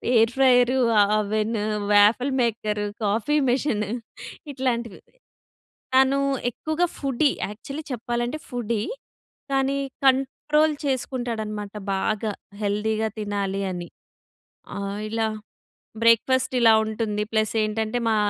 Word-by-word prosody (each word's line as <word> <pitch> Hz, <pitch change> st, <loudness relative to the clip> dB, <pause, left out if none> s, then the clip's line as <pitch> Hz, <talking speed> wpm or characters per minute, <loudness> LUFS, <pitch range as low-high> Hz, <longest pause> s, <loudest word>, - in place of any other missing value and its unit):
Air 225 Hz, 0 st, +5 dB
fryer 255 Hz, -1 st, +4 dB, 0.2 s
ఆహ్, 205 Hz, 0 st, +3 dB
oven, 215 Hz, +2 st, -1 dB, 0.3 s
waffle 215 Hz, +6 st, +5 dB
maker, 215 Hz, -3 st, -1 dB, 0.2 s
coffee 220 Hz, +8 st, +1 dB
machine 245 Hz, -4 st, +1 dB, 0.7 s
ఇట్లాంటివి. 240 Hz, -5 st, -2 dB, 1.0 s
తను 265 Hz, +1 st, +5 dB, 0.3 s
ఎక్కువగా 315 Hz, +8 st, -1 dB
ఫుడ్డీ. 275 Hz, +1 st, +1 dB, 0.2 s
యాక్చువల్లి 275 Hz, +9 st, -7 dB
చెప్పాలంటే, 240 Hz, +3 st, -2 dB
ఫుడ్డీ. 235 Hz, -3 st, -2 dB, 0.7 s
కానీ, 270 Hz, 0 st, +1 dB, 0.3 s
కంట్రోల్ 300 Hz, +4 st, +3 dB
చేసుకుంటాడన్నమాట. 230 Hz, -6 st, -3 dB, 0.2 s
బాగా 215 Hz, +2 st, -1 dB, 0.3 s
హెల్తీ‌గా 215 Hz, +2 st, 0 dB
తినాలి 200 Hz, -2 st, -2 dB
అని. 175 Hz, -1 st, -6 dB, 0.9 s
ఆహ్, 200 Hz, +1 st, -4 dB
ఇలా 225 Hz, 0 st, 0 dB, 0.8 s
బ్రేక్‌ఫాస్ట్ 255 Hz, +3 st, +3 dB
ఇలా 225 Hz, -2 st, +7 dB
ఉంటుంది. 215 Hz, -1 st, -2 dB
ప్లస్ 215 Hz, 0 st, +1 dB
ఏంటంటే, 220 Hz, +2 st, -1 dB
మా 220 Hz, -, +2 dB
230 Hz, 100 wpm, -24 LUFS, 210-260 Hz, 1.0 s, ఇలా